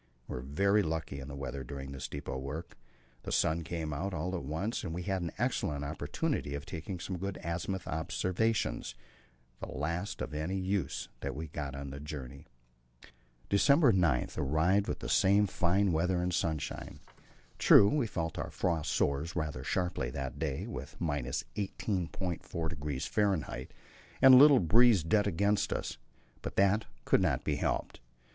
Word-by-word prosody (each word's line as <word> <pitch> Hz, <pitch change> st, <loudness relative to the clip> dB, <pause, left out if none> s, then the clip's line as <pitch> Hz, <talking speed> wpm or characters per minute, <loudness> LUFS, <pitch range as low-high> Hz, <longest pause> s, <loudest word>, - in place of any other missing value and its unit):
We -, -, -6 dB
were 60 Hz, -, -4 dB
very 100 Hz, +10 st, +2 dB
lucky 80 Hz, -5 st, -3 dB
in 65 Hz, -, -7 dB
the 70 Hz, -, -7 dB
weather 70 Hz, -1 st, -5 dB
during 70 Hz, +1 st, -7 dB
this 65 Hz, -1 st, -5 dB
depot 70 Hz, -2 st, -5 dB
work; 75 Hz, +6 st, -6 dB, 0.5 s
the -, -, -6 dB
sun 80 Hz, +2 st, +2 dB
came 80 Hz, -2 st, -3 dB
out 90 Hz, +6 st, -3 dB
all 90 Hz, +4 st, -2 dB
at 85 Hz, -, -4 dB
once, 80 Hz, -, -2 dB
and 80 Hz, -3 st, -4 dB
we 90 Hz, -, -4 dB
had 95 Hz, 0 st, -1 dB
an 85 Hz, -2 st, -3 dB
excellent 70 Hz, -1 st, -1 dB
opportunity 75 Hz, -, -2 dB
of 70 Hz, 0 st, -6 dB
taking 90 Hz, +1 st, -6 dB
some 90 Hz, +1 st, -4 dB
good 100 Hz, 0 st, -3 dB
azimuth 85 Hz, +2 st, -3 dB
observations, 90 Hz, -, -1 dB, 0.6 s
the -, -, -5 dB
last 85 Hz, +8 st, -3 dB
of -, -, -4 dB
any 80 Hz, +6 st, -2 dB
use 95 Hz, -6 st, -2 dB
that -, -, -4 dB
we 80 Hz, +1 st, -5 dB
got 70 Hz, -2 st, -5 dB
on 70 Hz, 0 st, -6 dB
the 70 Hz, -, -7 dB
journey. 70 Hz, 0 st, -8 dB, 1.0 s
December 140 Hz, +7 st, +5 dB
9 85 Hz, -, +2 dB
arrived 85 Hz, +8 st, +2 dB
with -, -, -3 dB
the -, -, -4 dB
same 100 Hz, +2 st, +4 dB
fine 95 Hz, +1 st, +2 dB
weather 90 Hz, +3 st, +1 dB
and 90 Hz, 0 st, -1 dB
sunshine. 80 Hz, -3 st, -2 dB, 0.6 s
True, 100 Hz, -, +8 dB
we 130 Hz, +1 st, +1 dB
felt 80 Hz, -5 st, -3 dB
our -, -, -3 dB
frost 80 Hz, -4 st, -1 dB
sores 70 Hz, +4 st, 0 dB
rather 80 Hz, -4 st, -2 dB
sharply 85 Hz, -9 st, -1 dB
that 65 Hz, 0 st, -5 dB
day, 70 Hz, -4 st, -2 dB
with -, -, -7 dB
18.4° 80 Hz, -, -3 dB
F. -, -, -15 dB, 1.0 s
and 130 Hz, 0 st, +9 dB
a -, -, +11 dB
little 140 Hz, -1 st, +9 dB
breeze 110 Hz, +1 st, +5 dB
dead 105 Hz, +5 st, +2 dB
against 100 Hz, +4 st, +1 dB
us, -, -, -3 dB, 0.4 s
but -, -, -5 dB
that 100 Hz, +3 st, +3 dB, 0.2 s
could -, -, +4 dB
not -, -, +1 dB
be -, -, 0 dB
helped. -, -, -2 dB
85 Hz, 165 wpm, -32 LUFS, 75-95 Hz, 1.0 s, a